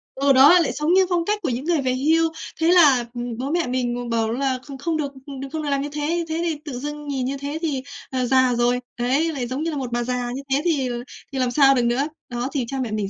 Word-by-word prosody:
Ừ, 275 0 +3
đó, 285 +7 +8
lại 330 - +1
sống 300 +4 +1
như 380 0 +5
phong 345 -2 +1
cách 420 0 0
của 300 - -1
những 250 +4 -3
người 335 -4 +1
về 255 -1 0
hưu. 320 +5 +2 0.3
Thế 325 - +3
là, 285 -9 +6
ừm, 240 -1 -5
bố 270 +4 -3
mẹ 340 -5 0
mình 245 -1 -1
ng 245 0 -4
bảo 225 -1 0
là 260 +1 -1
kh - - -9
không 320 +2 -1
được 285 -2 -2 0.3
được 275 - -5
không 315 -1 -3
được 290 - -2
làm 275 -1 +1
như 290 - -4
thế. 320 +3 -1
Thế 325 +1 -1
thì 325 -2 0
tự 255 -4 -5
dưng 295 +1 -6
nhìn 265 -3 -2
như 275 +1 -2
thế 285 +3 -4
thì, 285 -6 -1 0.3
à, 255 -1 -1
già 255 -1 +3
rồi. 245 +1 +2 0.2
Đấy, 280 +7 +1
lại 250 -4 -3
giống 265 +5 -3
như 330 - -1
là 295 - -4
1 255 -3 -4
bà 240 0 0
già 245 0 -2
như 265 +2 -4
thế 280 +2 +3
thì 280 -7 +1 0.4
thì 265 - -3
làm 250 -1 +1
sao 275 0 +5
được 245 - +2
nữa. 255 +5 +1 0.2
Đó, 240 +2 -3
thì 265 -5 -1
cha 270 - -4
mẹ 230 -4 -3
mình 210 -2 -2
275 Hz, 285 wpm, -22 LUFS, 250-305 Hz, 0.4 s, đó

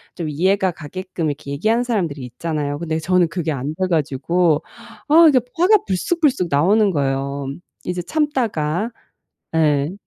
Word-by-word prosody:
좀 165 -3 -4
이해가 185 +5 +1
가게끔 175 +1 -5
이렇게 145 -1 -5
얘기하는 220 +12 +1
사람들이 175 - -2
있잖아요. 145 +3 -3
근데 160 -1 -2
저는 180 +1 +2
그게 165 -1 -3
안 140 +1 -3
돼 185 +2 -1
가지고 160 +1 +1 0.5
아 330 +3 +7
이게 275 -4 +5 0.2
화가 380 +4 +4
불쑥불쑥 255 - +1
나오는 195 +9 +3
거예요. 140 -2 -2 0.4
이제 180 0 -3
참다가 225 - -1 0.6
네. 150 -1 +2
170 Hz, 320 characters per minute, -20 LUFS, 145-200 Hz, 0.6 s, 아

